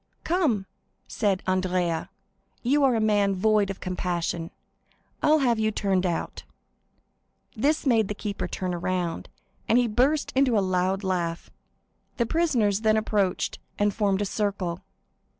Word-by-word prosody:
"Come," 305 - +1 0.4
said 200 -4 0
Andrea, 185 -3 0 0.5
"you 280 +4 +3
are 260 -3 +4
a - - +1
man 205 -2 +2
void 210 +1 +2
of 195 - -5
compassion; 175 -2 -2 0.7
I'll 305 +1 +5
have 235 -2 +2
you 215 0 +2
turned 195 -3 0
out." 170 - -3 1.1
This 290 +8 +1
made 225 -6 +3
the 210 - -4
keeper 205 -1 -4
turn 185 -1 -3
around, 175 -1 -2 0.4
and 230 - +5
he 245 -1 +3
burst 265 +7 +1
into 260 -4 +3
a 195 -2 +1
loud 185 +2 0
laugh. 175 -3 -2 0.7
The 235 - +2
prisoners 235 - +1
then 220 -1 +3
approached 205 -4 0 0.2
and 205 0 +1
formed 200 -1 +1
a - - -1
circle. 195 -4 -2
205 Hz, 140 wpm, -26 LUFS, 185-230 Hz, 1.1 s, I'll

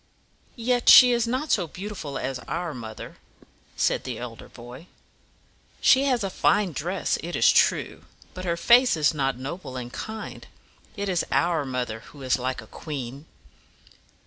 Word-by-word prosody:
"Yet 245 0 +1
she 250 -1 +10
is 235 -1 +1
not 260 +6 -2
so 180 -5 +2
beautiful 180 -5 -6
as 130 -1 -4
our 170 -2 -3
mother," 110 -3 -9 0.6
said - - +1
the - - -5
elder - - -9
boy. 120 +8 -12 0.9
"She 265 +1 +5
has 250 -5 +1
a 195 - -3
fine 205 0 +2
dress, 175 +6 -2
it 175 +2 -5
is - - +5
true; - - +1 0.3
but 185 - -7
her 170 -2 -1
face 245 +1 +5
is 155 +1 +2
not 135 -4 -1
noble 135 0 -7
and 120 -1 -7
kind. 220 0 -7 0.5
It 200 0 -3
is 180 -3 0
our 170 -4 +1
mother 125 -4 -3
who 135 +4 -14
is 130 0 +1
like 130 -1 -3
a - - -14
queen." 140 +2 -7
165 Hz, 160 wpm, -25 LUFS, 130-210 Hz, 0.9 s, she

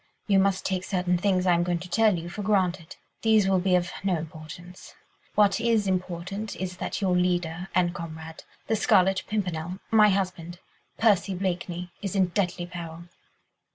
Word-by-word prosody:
You 195 -2 +4
must 190 -1 +1
take 185 -1 -1
certain 180 -2 0
things 185 -1 +1
I 180 - +4
am 170 - +2
going 175 0 0
to 180 +2 -8
tell 215 +1 +3
you 165 +1 -6
for 190 +4 -6
granted. 185 -5 0 0.3
These 220 -3 +4
will 190 -1 +3
be 185 0 +2
of 180 0 0
no 190 -3 +1
importance. 160 +3 -10 0.4
What 205 -1 +4
is 230 -3 +2
important 185 +2 -3
is 185 -1 -5
that - - -4
your 185 -2 +2
leader 180 0 0
and 175 -1 +2
comrade, 160 -1 -8 0.2
the 220 - +1
Scarlet 190 -2 +3
Pimpernel... 180 -4 -3
my 215 -1 +6
husband... 180 -3 -2 0.4
Percy 205 -3 +3
Blakeney... 180 -1 -3
is 200 -2 -4
in 190 -2 +3
deadly 175 -1 -1
peril." 170 -1 -8
180 Hz, 170 wpm, -26 LUFS, 175-195 Hz, 0.4 s, my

